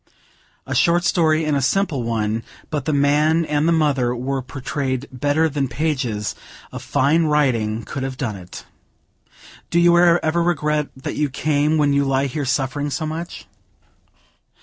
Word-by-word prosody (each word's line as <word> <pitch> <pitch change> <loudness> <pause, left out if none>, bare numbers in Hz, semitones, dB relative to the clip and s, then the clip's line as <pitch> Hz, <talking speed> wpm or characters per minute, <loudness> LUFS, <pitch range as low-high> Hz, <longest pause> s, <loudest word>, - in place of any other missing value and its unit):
A - - -4
short 175 +1 +3
story 160 -2 +2
and 150 -1 +1
a 140 - +1
simple 165 -1 0
one, 110 -1 -1 0.3
but 150 -4 -2
the - - 0
man 150 +3 +2
and 150 +1 0
the - - +3
mother 140 -7 +1
were 135 +2 -2
portrayed 130 0 -4
better 145 +5 +1
than 140 -3 -1
pages 125 -6 -2 0.4
of - - -7
fine 155 +5 +2
writing 120 -8 +1
could 135 - -6
have 130 -1 -4
done 120 -7 -3
it. 90 -2 -10 1.0
"Do 170 - +2
you 175 0 +5
ever 170 -1 +3
regret 150 -3 0
that 130 - -5
you 150 -1 +1
came, 150 +2 +1
when 145 -2 +2
you 140 0 +3
lie 135 0 +1
here 140 +1 -3
suffering 135 +3 -1
so 145 +3 -3
much?" 165 +3 -6
145 Hz, 160 wpm, -21 LUFS, 130-155 Hz, 1.0 s, you